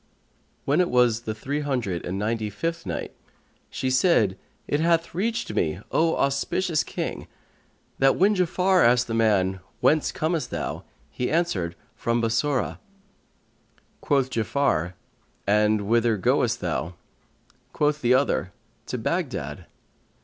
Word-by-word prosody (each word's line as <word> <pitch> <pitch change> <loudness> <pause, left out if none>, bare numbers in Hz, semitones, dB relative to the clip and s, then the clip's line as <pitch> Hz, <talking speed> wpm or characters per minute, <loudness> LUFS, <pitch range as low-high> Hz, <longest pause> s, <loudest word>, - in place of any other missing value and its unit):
When 145 +6 +3
it 180 - +1
was 120 -2 +3
the 110 - -2
Three 140 +6 -3
Hundred 125 - -2
and 90 +2 -3
Ninety 110 +1 -1
fifth 165 - -4
Night, 85 - -4 0.6
She 130 - -2
said, 130 - +3 0.3
it 145 - 0
hath 165 0 +1
reached 230 +6 -2
me, 80 +1 0
O 165 0 +2
auspicious 145 +4 0
King, - - -5 0.7
that 135 0 +4
when 205 +3 +3
Ja'afar 185 0 +3
asked 125 +1 +4
the 115 - -5
man, 100 -4 +2 0.2
"Whence 155 0 +3
comest 160 0 -1
thou?"; - - -4 0.3
he 125 - -2
answered 100 - 0 0.2
"From 115 0 0
Bassorah." 120 +4 0 1.2
Quoth 135 -3 +1
Ja'afar, 110 - 0 0.5
"And 105 +1 +3
whither 115 +2 +2
goest 90 - +1
thou?" 85 +2 -2 0.8
Quoth 150 0 0
the 125 +1 +4
other, 130 -8 0 0.3
"To - - -3
Baghdad." - - -3
125 Hz, 130 wpm, -25 LUFS, 105-155 Hz, 1.2 s, that